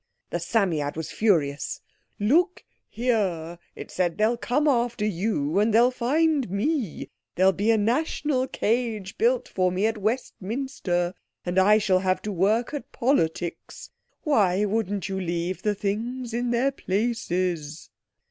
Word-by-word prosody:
The - - -1
Psammead 160 -10 0
was 160 - -4
furious. 155 -10 +1 0.4
"Look 335 - +2 0.3
here," 190 -9 -1 0.2
it - - -9
said, 175 -2 0
"they'll 215 +3 +3
come 265 +5 0
after 240 -5 +1
you, 190 -4 0
and 215 +2 +3
they'll 235 +3 +5
find 280 - +1
me. 220 - -2 0.2
There'll 190 +2 +5
be 200 +4 -1
a 225 - +5
National 260 +3 0
Cage 220 -5 -1
built 485 +2 +2
for 185 -1 0
me 185 +3 0
at 220 -1 0
Westminster, 210 -4 -2 0.3
and 180 +1 +1
I 210 +3 +6
shall 195 -3 +2
have 185 0 +1
to 210 - -3
work 210 - +1
at 290 - -6
politics. 175 - -1 0.3
Why 205 - +3
wouldn't 205 -3 -1
you 190 -1 -3
leave 175 0 -2
the 210 -1 0
things 230 +5 -3
in 240 +1 -1
their 245 +3 +2
places?" 185 - -2
210 Hz, 140 wpm, -25 LUFS, 185-245 Hz, 0.4 s, I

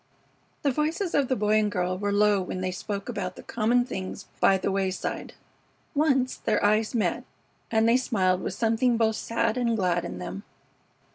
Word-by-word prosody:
The 280 - +3
voices 320 +7 -1
of 280 -2 +2
the 260 - +1
Boy 215 -1 +2
and 210 -1 0
girl 180 -1 -1
were 205 +2 -2
low 205 -1 +3
when 185 0 -4
they 185 0 -1
spoke 200 +2 -5
about 180 -2 -4
the - - -11
common 240 +2 +1
things 190 -3 -6
by 195 - +5
the 190 - -1
wayside. 190 -1 -2 0.6
Once 270 -4 +2
their - - 0
eyes 215 +2 +2
met, 220 - 0 0.5
and 220 0 +3
they 235 +2 +5
smiled 185 -8 +1
with 185 - -4
something 230 +1 +2
both 220 -1 +2
sad 230 +1 -1
and 235 -2 +1
glad 180 -3 +1
in - - -6
them. 90 +2 -6
215 Hz, 185 wpm, -26 LUFS, 190-240 Hz, 0.6 s, by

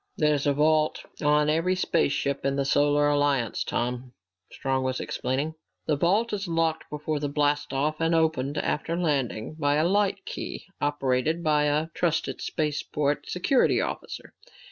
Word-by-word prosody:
"There 150 -1 +3
is 145 0 -1
a 145 - +3
vault 155 +1 +2 0.2
on 150 0 +3
every 165 +4 +2
spaceship 140 -6 0
in 135 0 0
the 140 0 0
Solar 145 +1 +3
Alliance, 145 -5 +1
Tom," 125 +1 -3 0.4
Strong 135 -1 -1
was 130 0 -1
explaining. 140 +5 -2 0.3
"The 150 - +1
vault 200 +10 +1
is 200 -2 -2
locked 165 -1 0
before 150 0 -3
blast 145 0 0
off 150 +4 -1
and 165 +1 +2
opened 155 -3 +1
after 165 +3 -1
landing 140 -8 -1
by 145 -1 +2
a 155 +3 +2
light 200 0 +1
key - - -6 0.2
operated 145 0 +1
only 170 - -9
by 150 -1 +3
a 150 +2 +1
trusted 165 -2 -1
spaceport 150 -1 -1
security 245 +9 +2
officer. - - -5
150 Hz, 155 wpm, -26 LUFS, 140-160 Hz, 0.4 s, There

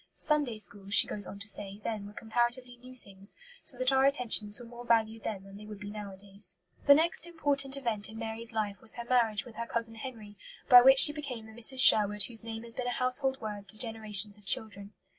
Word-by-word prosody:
"Sunday 295 -7 0
schools," 200 -1 +1
she - - +8
goes 205 - -6
on 200 - -9
to 200 +2 -5
say, 200 0 -6
"then 210 -3 -5
were 205 - -13
comparatively 240 +3 -3
new 255 +1 -15
things, 200 -4 +2 0.3
so 275 -6 +3
that 255 +1 0
our 265 0 +2
attentions 240 -6 +1
were 240 - -11
more 240 +1 -12
valued 225 -1 0
then 200 -3 -6
than 195 0 -14
they 210 - -12
would 210 -2 -10
be 205 0 -9
nowadays." 200 -2 -7 0.3
The 285 - +8
next 330 +2 0
important 280 -5 -1
event 225 -6 -4
in 220 - -11
Mary's 225 +1 -7
life 210 -3 -4
was 225 - +2
her 235 - -8
marriage 230 -4 0
with 230 -3 -14
her 235 0 -5
cousin 230 -1 -3
Henry, 220 -3 -10 0.3
by 250 -2 +9
which 265 +2 +6
she 295 - +8
became 270 -7 -8
the 220 - -14
"Mrs. 235 +4 +3
Sherwood" 210 -4 +6
whose 225 +1 -1
name 225 0 -8
has 230 -1 -10
been 250 0 -5
a 245 - -2
household 260 +2 -1
word 205 -2 -7
to 215 - -10
generations 215 -3 +1
of 205 - -25
children. 200 0 -1
225 Hz, 225 wpm, -29 LUFS, 205-250 Hz, 0.3 s, by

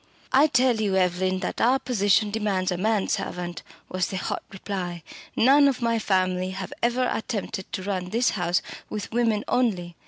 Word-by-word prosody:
"I 280 +4 +6
tell 250 -3 +3
you, 200 -3 +1
Evelyn, 185 0 +1
that - - -3
our 250 +3 +4
position 210 -5 +2
demands 200 -4 0
a - - 0
man 210 +1 +1
servant!" 175 -1 -3 0.3
was 185 -1 -1
the 190 - -4
hot - - -3
reply. 185 -3 -5 0.3
"None 280 +4 +6
of 270 -3 0
my 230 -2 +1
family 185 -2 +1
have - - -5
ever 245 +2 +1
attempted 205 -4 -4
to 190 - -4
run 185 -2 -3
this 235 +5 +2
house 175 -2 0 0.3
with 210 -1 -5
women 225 -3 +1
only. 185 -9 0
205 Hz, 175 wpm, -25 LUFS, 185-235 Hz, 0.3 s, I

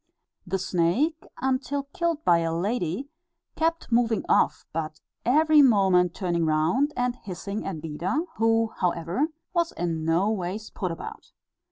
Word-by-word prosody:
The 190 +2 0
snake 190 - 0 0.2
until 265 +2 0
killed 335 -3 -1
by 170 -1 +5
a 165 0 -1
lady 200 - -2 0.4
kept 330 -4 -1
moving 230 -1 +2
off, - - +2
but 155 -1 -4 0.3
every 305 +4 +5
moment 190 - +4
turning 175 -3 0
round, 160 - +2
and 245 0 0
hissing 200 0 -5
at 170 -6 -4
Beda, 170 - -1 0.2
who, 225 0 +2
however, 175 - 0 0.3
was 340 -2 +1
in 165 -2 -2
no 170 +6 +2
ways 205 +1 -4
put 185 - -3
about. 165 - -8
200 Hz, 140 wpm, -26 LUFS, 170-265 Hz, 0.4 s, by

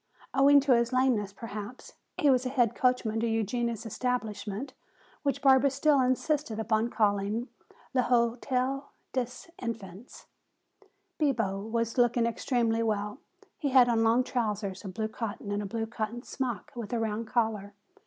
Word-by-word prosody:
Owing 280 +1 +6
to 270 -2 +4
his 235 +1 +1
lameness 255 -6 +2
perhaps, 210 +2 -8 0.2
he 290 - +4
was 255 -1 +3
head 255 -4 +2
coachman 250 -3 +1
to 230 - 0
Eugenia's 230 +1 -1
establishment, 225 +1 -3 0.5
which 280 0 -1
Barbara 270 0 +6
still 280 +1 +3
insisted 255 -1 0
upon 220 +1 +1
calling 210 +2 0 0.4
"L'Hotel 255 +2 +1 0.2
des 255 -2 0 0.3
Enfants." 225 -2 -7 0.9
Bibo 225 -10 +1
was 230 +3 -2
looking 240 -1 +3
extremely 230 -1 0
well. 210 +1 -1 0.4
He 295 -4 0
had 255 -2 +6
on 225 -1 +3
long 230 +3 +4
trousers 210 -6 -2
of 195 - -6
blue 220 -1 -1
cotton 215 -2 -5
and 205 0 -1
a 205 - -4
blue 225 +2 -2
cotton 225 +1 -4
smock 245 -9 -4
with 235 -2 -6
a 235 - +1
round 225 0 -2
collar. 215 -4 -1
235 Hz, 145 wpm, -29 LUFS, 215-255 Hz, 0.9 s, Owing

